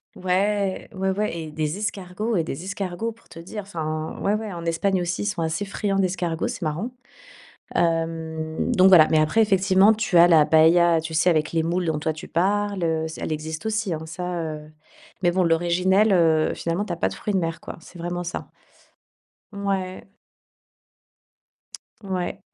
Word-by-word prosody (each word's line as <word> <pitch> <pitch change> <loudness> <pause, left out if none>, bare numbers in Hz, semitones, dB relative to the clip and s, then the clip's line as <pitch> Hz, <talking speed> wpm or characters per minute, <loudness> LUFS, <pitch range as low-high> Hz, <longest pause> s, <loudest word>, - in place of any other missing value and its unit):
Ouais, 195 +1 0
ouais, 190 0 -2
ouais, 205 -2 -2
et 160 -2 -6
des 155 +2 -2
escargots 210 +2 -3
et 170 - +2
des 160 +1 -6
escargots, 195 +2 -3
pour 230 +1 -21
te - - -13
dire 185 +6 -7
enfin, 155 -5 -4
ouais, 200 - +1
ouais. 215 0 -3
En 170 -1 -7
Espagne 185 +3 +1
aussi, 175 0 -2
ils - - -2
sont 190 -5 -2
assez 160 +5 -2
friands 200 0 -1
d'escargots, 180 -3 -1
c'est - - -5
marrant. 165 +9 -2 0.8
Hem, 165 -1 -1
donc 185 0 +6
voilà. 165 -5 +8
Mais, 160 - +3
après, 155 +9 +3
effectivement, 195 0 +4
tu 220 -4 +1
as 170 +1 +8
la 160 -3 +6
paella, 165 +2 +5
tu 160 0 -6
sais, 160 +3 +3
avec 155 -2 +1
les 165 -1 +1
moules, 175 +2 -1
dont 160 -2 -1
toi 160 +1 -1
tu 155 0 -9
parles, 200 +2 0
heu, 160 -1 0
se 160 - -9
elle - - -3
existe 155 +4 -5
aussi, 215 -4 -1
hein, 160 0 -5
ça, 175 +2 -4
heu. 155 -1 -6 0.5
Mais 175 - +4
bon, 185 +1 +1
l'originelle, 180 +5 +3
heu, 160 -4 +3
finalement, 170 +4 -2
tu 210 - -6
as 170 - -3
pas - - +1
de - - -5
fruits 210 - -4
de 190 - +2
mer, 165 -1 -3
quoi, - - -8
c'est 175 - -15
vraiment 175 +1 -4
ça. 170 - -6 1.0
Ouais. 195 -2 -3 1.9
Ouais. 185 -2 -3
175 Hz, 185 wpm, -23 LUFS, 160-195 Hz, 1.9 s, voilà